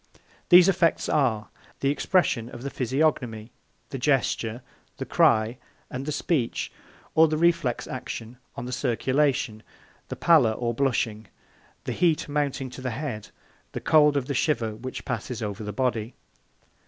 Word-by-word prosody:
These 175 0 +8
effects 180 -3 +2
are: 115 -8 +1 0.3
the 140 - +2
expression 145 -7 +1
of 120 0 -10
the 140 - -4
physiognomy, 125 -4 -1 0.4
the 135 - -5
gesture, 125 -3 0 0.3
the - - -4
cry, 110 +3 +3 0.3
and 130 +3 -5
the - - -1
speech; 145 -4 -1 0.4
or 160 0 +6
the 155 0 -1
reflex 165 -7 +1
action 125 -2 -7 0.2
on 120 - -5
the 125 - -5
circulation, 130 -2 0 0.5
the - - -5
pallor 145 -10 +4
or 120 +1 -2
blushing, 115 -4 -1 0.6
the - - -3
heat 170 -4 +1
mounting 145 -3 -2
to 130 - -9
the 130 - -2
head, 120 -3 -5
or - - -25 0.4
the - - -4
cold 150 -2 +5
of 135 - -1
the 140 - -3
shiver 120 -6 0
which 130 +4 -7
passes 120 -1 -4
over 105 0 -4
the 105 - -4
body. 120 -1 -2
130 Hz, 155 wpm, -26 LUFS, 115-145 Hz, 0.6 s, These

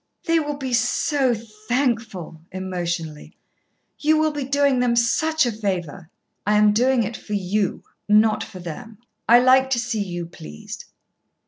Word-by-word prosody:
"They 330 0 +3
will 295 -2 -3
be 265 -3 -4
so 250 +2 +1
thankful," 220 - -3
emotionally. 175 -4 -5 0.6
"You 310 +1 +3
will 310 0 +2
be 290 -2 -4
doing 280 -1 +2
them 245 -1 +2
such 315 +6 +2
a 240 - 0
favour." 185 -6 -4 0.3
"I 210 0 +2
am 210 0 +5
doing 250 +2 +3
it 220 +2 -4
for 210 - -8
you, 200 0 -1 0.3
not 215 +1 +4
for 205 - -10
them. 180 +5 -8 0.3
I 235 - +9
like 260 +1 +5
to 255 -3 +1
see 235 -3 -2
you 175 -3 -4
pleased." 75 - -10
225 Hz, 150 wpm, -22 LUFS, 190-260 Hz, 0.6 s, I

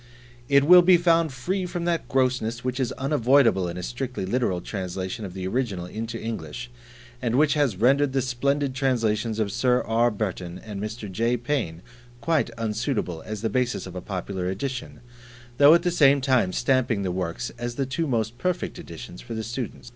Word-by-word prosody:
It 140 0 +5
will 180 +4 +9
be 180 0 +6
found 165 -2 +3
free 180 +9 -2
from 175 -1 -4
that 170 -2 -1
grossness 125 -3 0
which 125 +1 -2
is 130 -3 0
unavoidable 130 -7 +3
in 85 +1 -5
a 90 - -5
strictly 125 -2 -4
literal 95 -3 0
translation 95 +3 -4
of 90 -1 -8
the 95 -1 -4
original 100 -5 -2
into 115 +5 -5
English; 80 - -6 0.5
and 120 -2 0
which 145 +1 +4
has 145 -10 +1
rendered 135 +6 +3
the 135 -1 0
splendid 140 +2 0
translations 115 -5 0
of 105 -2 0
Sir 125 +2 +2
R. 115 +2 +2
Burton 95 -5 -4
and 100 0 -7
Mr. 110 +1 -5
J. 115 +6 +1
Payne 115 - -2 0.4
quite 160 +2 +1
unsuitable 110 - -2
as 110 0 -5
the - - +2
basis 125 -1 0
of 95 -1 -9
a 90 - -4
popular 95 -1 -4
edition, 120 +7 -5 0.6
though 145 +3 +9
at 170 - +2
the 175 - +1
same 140 -4 +5
time 130 -8 +2
stamping 120 -3 +1
the 95 - -1
works 90 +5 -3
as 120 0 -4
the 135 - -1
two 145 +5 -2
most 115 -2 -1
perfect 180 -2 -2
editions 90 - -9
for 115 - -7
the 110 - -3
student. 120 +1 -5
120 Hz, 185 wpm, -25 LUFS, 105-135 Hz, 0.6 s, will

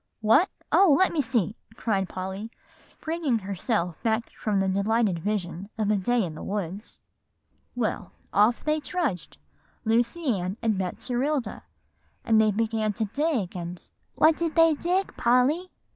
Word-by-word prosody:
"What? 225 - +4 0.2
oh, 365 -8 +6
let 375 - +3
me 315 - +2
see!" 225 -6 0 0.2
cried 195 -5 -1
Polly, 190 +4 -5 0.5
bringing 315 -6 0
herself 195 -3 -2
back 225 0 0
from 210 -3 -1
the 195 - +1
delightful 200 +2 +1
vision 195 -1 -3
of 215 -1 +1
a - - +3
day 230 +4 +1
in 165 -4 -4
the 155 - -9
woods; 200 0 -5 0.7
"well, 220 -5 -2 0.2
off 215 +4 +3
they 305 0 +1
trudged, 295 - -3 0.5
Lucy 235 +9 +1
Ann 185 +3 -3
and 225 -2 +1
Betserilda, 245 - -2 0.6
and 220 -1 +5
they 215 - +4
began 215 0 0
to 220 +2 -1
dig 260 - -1
and" 175 0 -7 0.3
"What 315 +1 +5
did 335 -2 -2
they 330 -1 +6
dig, 360 +6 -1
Polly?" 260 +10 +2
220 Hz, 145 wpm, -26 LUFS, 195-280 Hz, 0.7 s, oh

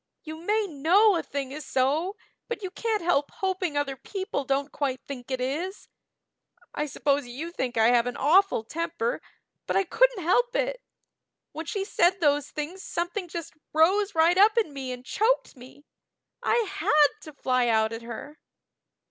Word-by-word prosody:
"You 315 -1 -7
may 420 +6 0
know 370 +6 +4
a 335 - 0
thing 275 -2 -5
is 300 +2 -6
so, 290 +10 0 0.3
but 475 -3 -5
you 370 - -4
can't 435 -2 -2
help 295 -5 +2
hoping 370 -5 -2
other 280 -2 -1
people 380 -1 -4
don't 275 +2 -1
quite 265 -3 -2
think 255 -3 -7
it 260 -1 -2
is. 310 +10 -3 0.8
I 300 - -2
suppose 280 -1 0
you 290 +8 -6
think 255 -8 -3
I 225 +1 +5
have 240 0 +3
an 245 - -4
awful 355 - +4
temper, 335 - -3 0.5
but - - -1
I 390 - +4
couldn't - - +2
help 480 +8 +2
it. - - -1 0.7
When 315 +1 -7
she 390 +3 -2
said 365 -1 +2
those 290 -3 +2
things 315 +6 -5
something 350 +2 -3
just 340 -1 -6 0.2
rose 385 +6 +3
right 335 +3 +4
up 425 +3 +6
in 425 -11 +1
me 265 -2 -5
and 250 0 -8
choked 450 - +1
me. 260 +3 -15 0.6
I - - +2
had 305 -7 +3
to 310 - -10
fly 255 -3 +1
out 220 -1 +2
at 225 - -6
her." 240 +6 -8
315 Hz, 175 wpm, -26 LUFS, 275-385 Hz, 0.8 s, up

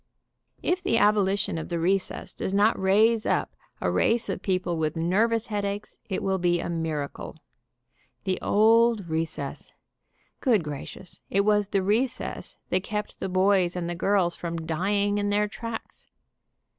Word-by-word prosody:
If 360 +1 +1
the 230 -11 +1
abolition 200 -4 +2
of - - -7
the 170 - -1
recess 185 +3 -1
does 190 - -3
not 210 +3 +4
raise 215 +4 +4
up - - 0 0.2
a 90 - 0
race 225 - +2
of - - -3
people 185 -2 -1
with 155 -1 -1
nervous 215 +7 +1
headaches 205 -1 -4
it 190 - -2
will 190 -1 0
be 175 0 +2
a - - -4
miracle. 160 -4 -4 0.9
The 190 -2 -1
old 225 -1 +4
re 160 0 0
cess! 145 -3 -7 0.7
Good 225 - +2
gracious, 150 +4 -8
it 200 - +2
was 210 0 +2
the 195 -1 0
recess 235 +6 -1
that 185 - +2
kept 210 0 -4
the 190 - -3
boys 185 -1 +3
and 175 -1 -2
the 175 - -2
girls 180 -1 +1
from 165 -1 -5
dying 200 +5 0
in 205 0 0
their 210 +1 +2
tracks. 230 +2 -7
195 Hz, 155 wpm, -26 LUFS, 175-210 Hz, 0.9 s, not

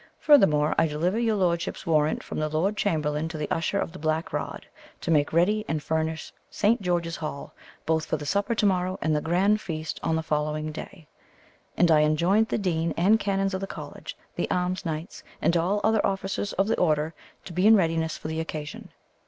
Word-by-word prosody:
"Furthermore, 155 - +5
I 165 - +4
delivered 170 +8 0
your 225 -2 +1
lordship's 175 -2 -1
warrant 155 -2 +1
from - - -5
the 155 0 -1
lord 170 +7 0
chamberlain 155 -6 0
to 160 -1 -6
the 150 - -3
usher 170 +4 0
of 185 - -2
the 185 - -10
black 155 +2 -1
rod, - - -4 0.4
to 170 - -2
make 145 -2 +3
ready 205 +6 +2
and 155 -2 -2
furnish 160 0 -2 0.2
Saint 215 +2 +1
George's 175 -2 -1
Hall, 155 -3 -6 0.3
both 160 0 0
for 155 - 0
the 150 - -7
supper 200 +9 0
to 210 - +1
morrow 185 -1 +1
and 155 -1 +1
the 150 - 0
grand 195 +6 +2
feast 155 -2 -5
on 160 - 0
the 160 - -1
following 155 0 -1
day; 160 +1 -9 0.7
and 175 -1 +4
I 155 - +6
enjoined 170 +8 +3
the - - -1
dean 170 -4 -1
and 205 +6 +4
canons 195 -1 0
of 190 - -2
the 195 - -3
college, - - -8 0.2
the - - -2
alms 180 +1 -1
knights, 160 +4 -5 0.2
and 170 - +2
all 175 +4 +2
the - - -3
other 220 -1 +2
officers 195 +1 -2
of 195 +2 +1
the 225 - 0
order, 155 -2 +1 0.3
to 175 - -8
be 180 +4 +3
in 220 - +8
readiness 165 -4 +1
for - - -7
the 160 +1 -3
occasion. 155 -2 -6
165 Hz, 210 wpm, -26 LUFS, 155-195 Hz, 0.7 s, in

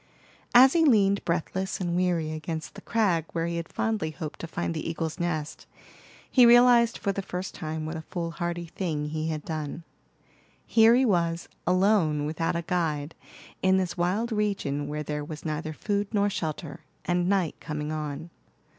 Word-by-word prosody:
As 260 +2 +9
he 335 - +4
leaned 200 -8 +4
breathless 180 +3 -2
and 175 -2 -1
weary 175 -3 +1
against 155 0 -5
the - - -10
crag 195 -8 +1
where 165 0 -1
he 170 0 -2
had 165 -1 -5
fondly 215 -8 -1
hoped 155 0 -7
to 165 - -5
find 170 +1 -3
the 160 0 -3
eagle's 165 -1 -3
nest, 155 -3 -3 0.6
he 255 - +6
realized 240 -1 +6
for 200 - -1
the 195 - -3
first 185 0 -5
time 155 -1 -4
what 160 +1 -4
a 160 - -4
fool 170 +1 -4
hardy 170 0 -3
thing 160 -4 -3
he 155 +1 -2
had 155 -2 -3
done. 155 0 -4 0.8
Here 225 +1 +6
he 260 +1 +4
was, 170 -5 +1 0.2
alone, 180 -5 +3
without 160 +2 -1
a 170 - -2
guide, 160 -3 -1 0.5
in 190 0 +4
this 185 -2 -1
wild 190 +7 0
region 195 -10 -1
where 150 +1 -3
there 150 0 -3
was 150 +1 -8
neither 155 0 -3
food 205 +5 -1
nor 205 -2 +2
shelter, 160 -2 -4 0.3
and 175 0 +1
night 190 -5 +1
coming 150 0 -4
on. 155 +1 -5
170 Hz, 175 wpm, -27 LUFS, 155-195 Hz, 0.8 s, As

